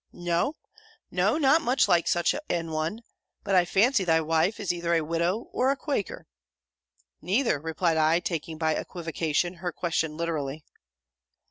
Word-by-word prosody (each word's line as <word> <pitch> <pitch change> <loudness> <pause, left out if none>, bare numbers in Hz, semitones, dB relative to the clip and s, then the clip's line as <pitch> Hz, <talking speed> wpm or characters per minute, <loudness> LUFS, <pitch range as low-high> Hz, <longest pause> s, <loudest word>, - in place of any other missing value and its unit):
'No 175 - -1 0.6
no! - - +2
not 300 +1 +4
much 255 -2 +2
like 170 -1 +3
such 175 0 +2 0.2
an 165 -2 -2
one. 160 +9 -3 0.4
But 200 - -2
I 180 -2 +5
fancy 205 +5 +3
thy 165 -2 +3
wife 160 +6 +1
is 190 -4 -1
either 170 -1 0
a 165 - +2
Widow 170 +7 -1
or 255 - +2
a 275 - +1
Quaker.' 275 -10 -3 1.0
'Neither,' 205 - +1
replied 160 +2 0
I, 160 +2 +3
taking, 165 -2 -4
by 160 -1 +1
equivocation, 165 0 -2
her 180 -1 -2
question 160 -3 -2
literally. 155 -3 -3
170 Hz, 150 wpm, -27 LUFS, 160-200 Hz, 1.0 s, I